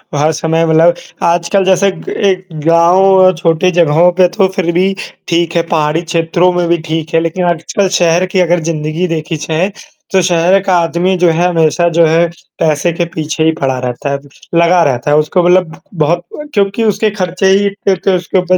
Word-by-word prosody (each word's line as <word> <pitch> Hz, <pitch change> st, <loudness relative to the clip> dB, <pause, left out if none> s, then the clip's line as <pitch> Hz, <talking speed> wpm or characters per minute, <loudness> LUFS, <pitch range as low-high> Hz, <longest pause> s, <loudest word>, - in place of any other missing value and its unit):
हर 150 Hz, +2 st, +1 dB
समय 160 Hz, +1 st, 0 dB
मतलब 165 Hz, +2 st, +3 dB, 0.3 s
आजकल 170 Hz, +3 st, +1 dB
जैसे 190 Hz, +1 st, +2 dB
क 185 Hz, -, -10 dB
एक 190 Hz, -2 st, -1 dB, 0.2 s
गाँव, 185 Hz, +3 st, +4 dB
छोटी 170 Hz, +2 st, +1 dB
जगहों 170 Hz, 0 st, +3 dB
पे 180 Hz, 0 st, +3 dB
तो 195 Hz, -, +3 dB
फिर 175 Hz, -2 st, -1 dB
भी 190 Hz, +3 st, +1 dB, 0.3 s
ठीक 170 Hz, 0 st, -1 dB
है, 170 Hz, -, +3 dB
पहाड़ी 155 Hz, -1 st, 0 dB
क्षेत्रों 170 Hz, +1 st, 0 dB
में 175 Hz, -1 st, -1 dB
भी 170 Hz, -, +2 dB
ठीक 160 Hz, 0 st, -4 dB
है, 165 Hz, -, +4 dB
लेकिन 165 Hz, +2 st, -2 dB
आजकल 175 Hz, +3 st, -1 dB
शहर 175 Hz, -1 st, +2 dB
की 185 Hz, +1 st, -2 dB
अगर 175 Hz, -1 st, +2 dB
ज़िंदगी 155 Hz, +2 st, -2 dB
देखी 165 Hz, 0 st, -3 dB
जाए, 160 Hz, +6 st, -2 dB, 0.4 s
तो 190 Hz, -, +4 dB
शहर 175 Hz, +2 st, +2 dB
का 190 Hz, -2 st, +1 dB
आदमी 170 Hz, +3 st, 0 dB
जो 180 Hz, -1 st, +3 dB
है 170 Hz, +2 st, +1 dB
हमेशा 165 Hz, +1 st, +1 dB
जो 165 Hz, 0 st, +3 dB
है 165 Hz, +2 st, +2 dB, 0.3 s
पैसे 155 Hz, +2 st, +1 dB
के 170 Hz, 0 st, -2 dB
पीछे 155 Hz, 0 st, -3 dB
ही 160 Hz, -, +3 dB
पड़ा 130 Hz, -2 st, 0 dB
रहता 125 Hz, +3 st, -4 dB
है, 140 Hz, -, -2 dB, 0.4 s
लगा 170 Hz, +1 st, +4 dB
रहता 135 Hz, 0 st, -1 dB
है 150 Hz, -, +4 dB
उसको 155 Hz, +4 st, +1 dB
मतलब 180 Hz, -2 st, +1 dB
बहुत 165 Hz, +1 st, 0 dB, 0.2 s
अ, -, -, -7 dB
क्योंकि 200 Hz, +1 st, 0 dB
उसके 215 Hz, 0 st, +1 dB
खर्चे 185 Hz, -2 st, -3 dB
ही 200 Hz, +1 st, +2 dB
इत्ते 200 Hz, 0 st, -2 dB
होते 190 Hz, 0 st, 0 dB
उसके 180 Hz, +1 st, -2 dB
ऊपर 185 Hz, 0 st, +1 dB
170 Hz, 195 wpm, -12 LUFS, 160-185 Hz, 0.4 s, गाँव